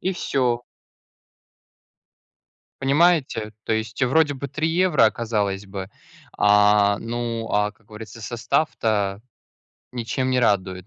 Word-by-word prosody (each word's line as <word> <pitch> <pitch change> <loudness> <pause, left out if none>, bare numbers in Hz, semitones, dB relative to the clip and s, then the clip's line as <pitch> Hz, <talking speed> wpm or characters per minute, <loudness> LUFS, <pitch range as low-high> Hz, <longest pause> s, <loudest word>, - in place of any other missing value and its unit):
и 190 - -1
всё. 125 -7 0 2.2
Понимаете, 140 -6 +2
то - - -1
есть 110 0 -3
вроде 145 +2 +2
бы 140 +1 -5
3 155 +4 -2
евро, 170 -6 +3
а - - +3
казалось 105 -4 -2
бы, 95 0 -7 0.5
а, 105 0 +4
ну, 115 0 -4
а, 105 0 +1
как 105 +1 -32
говорится, 110 0 -11
состав-то 110 -4 -1 0.7
ничем 125 +2 -2
не 130 - +2
радует. 95 -5 0
115 Hz, 115 wpm, -23 LUFS, 105-130 Hz, 2.2 s, а